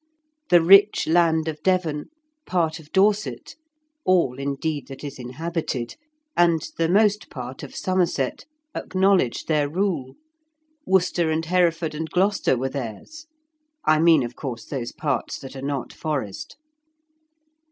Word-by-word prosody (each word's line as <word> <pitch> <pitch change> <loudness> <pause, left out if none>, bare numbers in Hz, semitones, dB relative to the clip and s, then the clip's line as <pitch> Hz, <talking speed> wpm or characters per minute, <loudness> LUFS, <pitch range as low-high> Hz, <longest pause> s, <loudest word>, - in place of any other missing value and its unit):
The 175 -2 +6
rich 195 +4 +6
land 160 -1 +3
of 155 -1 -4
Devon, 170 -5 0 0.4
part 165 -3 0
of 155 -1 -16
Dorset 205 +2 +1 0.5
(all, 170 -9 +2
indeed, 140 +2 -3
that 135 +1 -10
is 140 -2 -7
inhabited), 130 -1 -4 0.4
and 170 -2 +3 0.2
the 165 0 +2
most 210 +2 +3
part 125 -2 -7
of - - -9
Somerset, 180 -8 -1 0.3
acknowledged 185 -8 +1
their 150 -2 +1
rule. 165 -6 -2 0.7
Worcester 180 -3 +2
and 160 +1 -1
Hereford 165 -2 +1
and 160 +1 -4
Gloucester 190 -7 +2
were 130 +2 -1
theirs; 140 - -7 0.6
I 155 0 +4
mean, 160 -4 +5
of 120 0 -6
course, 120 -5 -6
those 125 -4 -4
parts 150 -3 -2
that 135 0 -10
are 135 - -7
not 140 -2 -3
forest. 140 - -4
160 Hz, 130 wpm, -23 LUFS, 135-180 Hz, 0.7 s, The